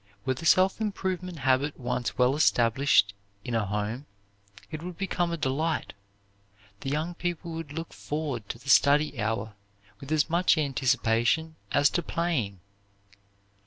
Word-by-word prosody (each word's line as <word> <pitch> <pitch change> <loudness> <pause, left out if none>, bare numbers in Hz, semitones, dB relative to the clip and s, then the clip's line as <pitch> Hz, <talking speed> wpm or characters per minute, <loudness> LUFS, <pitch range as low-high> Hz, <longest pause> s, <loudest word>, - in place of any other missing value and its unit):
Were 130 - +1
the 165 +6 -4
self 190 +3 +4
improvement 185 -4 -3
habit 135 +1 +1
once 125 -1 -2
well 125 +2 +3
established 120 -6 +3 0.3
in 120 - -4
a 110 -3 0
home, 105 +7 -3 0.6
it 155 -1 -5
would 175 0 -7
become 180 -3 -1
a 170 - -2
delight. 155 +3 -1 0.9
The 135 - -4
young 155 +5 -1
people 175 -1 -4
would 165 -3 -6
look 165 +2 -6
forward 145 -8 -4
to - - -4
the 130 +4 -17
study 145 -3 +4
hour 110 0 -2 0.5
with 140 +2 -9
as 155 -2 +3
much 170 +1 +3
anticipation 135 +1 +1 0.2
as 145 0 +4
to 175 - 0
playing. 150 - -2
145 Hz, 145 wpm, -27 LUFS, 125-165 Hz, 0.9 s, self